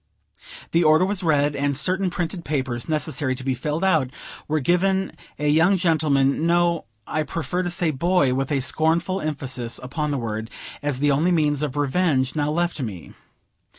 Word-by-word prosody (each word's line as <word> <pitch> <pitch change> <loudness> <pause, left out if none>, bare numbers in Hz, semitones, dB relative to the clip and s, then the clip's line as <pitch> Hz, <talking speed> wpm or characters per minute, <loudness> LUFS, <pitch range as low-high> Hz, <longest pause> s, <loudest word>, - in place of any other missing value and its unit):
The 170 +1 +3
order 155 +3 +5
was 195 0 -1
read, 145 -4 +2
and 140 -1 0
certain 185 +4 +1
printed 175 0 -3
papers, 130 -3 -3
necessary 150 -3 -1
to 130 - -7
be 130 0 0
filled 150 +5 -3
out, 160 -9 +2 0.4
were 155 +1 +1
given 190 +5 +1 0.3
a 150 - -1
young 160 +6 +4
gentleman 155 -4 +2
no, 170 -2 +2 0.2
I 155 - -1
prefer 165 +4 -2
to 175 - -2
say 175 -2 0
Boy, 155 -2 +2
with 135 +1 -2
a 140 -2 +1
scornful 165 +7 +1
emphasis 130 -6 -3
upon 150 +4 -3
the 145 - -1
word, 110 -2 -4 0.3
as 145 -3 -1
the 145 +2 +2
only 155 +6 +2
means 150 -4 +2
of 145 -2 -3
revenge 145 -2 +1
now 150 -1 0
left 170 0 -1
me. 95 - -6
150 Hz, 175 wpm, -23 LUFS, 135-170 Hz, 0.4 s, order